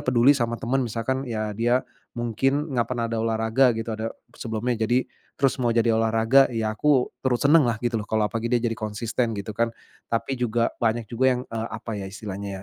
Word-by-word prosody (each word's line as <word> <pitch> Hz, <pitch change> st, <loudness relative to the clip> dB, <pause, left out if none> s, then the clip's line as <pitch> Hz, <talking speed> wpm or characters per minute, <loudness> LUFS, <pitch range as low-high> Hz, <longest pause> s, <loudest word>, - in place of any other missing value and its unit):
peduli 130 Hz, +2 st, +5 dB
sama 120 Hz, -4 st, -1 dB
teman, 130 Hz, +4 st, 0 dB
misalkan 125 Hz, +4 st, -2 dB
ya 110 Hz, -2 st, -2 dB
dia 120 Hz, +4 st, +1 dB, 0.3 s
mungkin 135 Hz, +6 st, 0 dB
nggak 120 Hz, -2 st, +1 dB
pernah 120 Hz, -2 st, -1 dB
ada 115 Hz, -, 0 dB
olahraga 115 Hz, +3 st, +2 dB
gitu, 115 Hz, +1 st, -4 dB
ada 110 Hz, +1 st, -3 dB, 0.2 s
sebelumnya, 115 Hz, 0 st, -2 dB
jadi 125 Hz, +2 st, +2 dB, 0.3 s
terus 135 Hz, -1 st, +1 dB
mau 120 Hz, -, +2 dB
jadi 115 Hz, 0 st, +3 dB
olahraga, 115 Hz, +4 st, +4 dB
ya 115 Hz, -3 st, -1 dB
aku 130 Hz, +3 st, +2 dB
terus 125 Hz, -2 st, 0 dB
seneng 150 Hz, -1 st, +6 dB
lah, 120 Hz, -2 st, +1 dB
gitu 120 Hz, -1 st, +1 dB
loh. 105 Hz, -, -7 dB
Kalau 110 Hz, -1 st, +1 dB
apalagi 115 Hz, 0 st, -2 dB
dia 120 Hz, -1 st, +1 dB
jadi 115 Hz, -, +1 dB
konsisten, 110 Hz, +2 st, -2 dB
gitu 100 Hz, +1 st, -5 dB
kan, 115 Hz, +3 st, +1 dB, 0.4 s
tapi 115 Hz, +4 st, -1 dB
juga 120 Hz, -1 st, +1 dB
banyak 115 Hz, -1 st, 0 dB
juga 120 Hz, +3 st, 0 dB
yang, 125 Hz, -, -3 dB
apa 115 Hz, 0 st, -4 dB
ya 95 Hz, -, -5 dB
istilahnya, 100 Hz, -1 st, -6 dB
115 Hz, 195 wpm, -25 LUFS, 110-125 Hz, 0.4 s, seneng